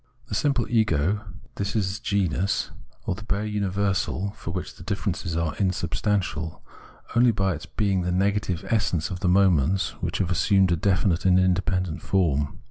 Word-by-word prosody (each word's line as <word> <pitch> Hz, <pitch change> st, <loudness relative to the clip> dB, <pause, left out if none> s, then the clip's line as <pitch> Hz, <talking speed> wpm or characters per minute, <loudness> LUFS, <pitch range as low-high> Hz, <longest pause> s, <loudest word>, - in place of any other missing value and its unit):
The -, -, -5 dB
simple 135 Hz, -5 st, +1 dB
ego 105 Hz, -2 st, +1 dB, 0.3 s
is 100 Hz, 0 st, -1 dB
this 100 Hz, -1 st, -1 dB
genus, 100 Hz, -3 st, 0 dB, 0.3 s
or -, -, 0 dB
the 105 Hz, +3 st, -8 dB
bare 105 Hz, 0 st, -1 dB
universal, 100 Hz, -1 st, -1 dB
for 105 Hz, -4 st, -9 dB
which 90 Hz, +1 st, -4 dB
the -, -, -14 dB
differences 95 Hz, -4 st, -2 dB
are 85 Hz, -2 st, 0 dB
insubstantial, 90 Hz, -4 st, -1 dB, 0.5 s
only 120 Hz, +1 st, +6 dB
by 95 Hz, -4 st, +1 dB
its 80 Hz, +1 st, -8 dB
being 100 Hz, -2 st, 0 dB
the 90 Hz, 0 st, -1 dB
negative 95 Hz, -1 st, 0 dB
essence 100 Hz, -6 st, 0 dB
of 90 Hz, -, -4 dB
the 90 Hz, -, +1 dB
moments 95 Hz, -1 st, +3 dB
which -, -, -2 dB
have 90 Hz, -2 st, -1 dB
assumed 95 Hz, +1 st, +3 dB
a -, -, +4 dB
definite 95 Hz, 0 st, +1 dB
and 90 Hz, -1 st, +5 dB
independent 95 Hz, -2 st, 0 dB
form. 75 Hz, -7 st, 0 dB
95 Hz, 160 wpm, -25 LUFS, 90-100 Hz, 0.5 s, only